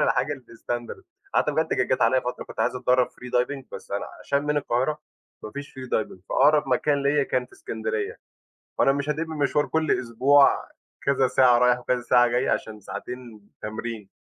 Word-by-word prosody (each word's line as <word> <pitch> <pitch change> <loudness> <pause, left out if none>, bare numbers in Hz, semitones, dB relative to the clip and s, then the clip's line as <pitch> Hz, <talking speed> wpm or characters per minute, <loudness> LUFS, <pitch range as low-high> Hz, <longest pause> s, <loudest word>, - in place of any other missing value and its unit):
الحاجة 130 +4 +2
الstandard. 120 -2 -6 0.3
حتّى 150 - +2
بجد 130 -4 +1
عليّا 125 +3 +4
فترة 125 0 -5
كنت - - -7
عايز 125 - +1
أتدرَّب 125 0 +3
free 125 0 -12
diving، 135 +2 -3
بس - - -9
أنا 100 0 -2
عشان 140 +6 0
من 150 0 0
القاهرة 140 +2 0 0.4
ما 110 - -7
فيش 140 +4 -7
free 130 -1 -7
diving، 110 - -1
فأقرب 145 0 +4
مكان 140 +2 +2
ليّا 140 +1 +3
كان 125 -2 -1
في - - -32
إسكندرية، 110 -1 -4 0.6
وأنا 135 - +5
مش 140 +1 -2
هادِب 160 +2 -1
مشوار 150 -1 +1
كل 160 -1 0
أسبوع 130 +4 +4 0.3
كذا 135 -1 +3
ساعة 125 -1 +5
رايح 125 0 +4
وكذا 125 0 -1
ساعة 120 0 +4
جاي 120 +2 0
عشان 110 -1 -2
ساعتين 115 0 -8
تمرين. 110 -1 -5
125 Hz, 175 wpm, -25 LUFS, 120-140 Hz, 0.6 s, وأنا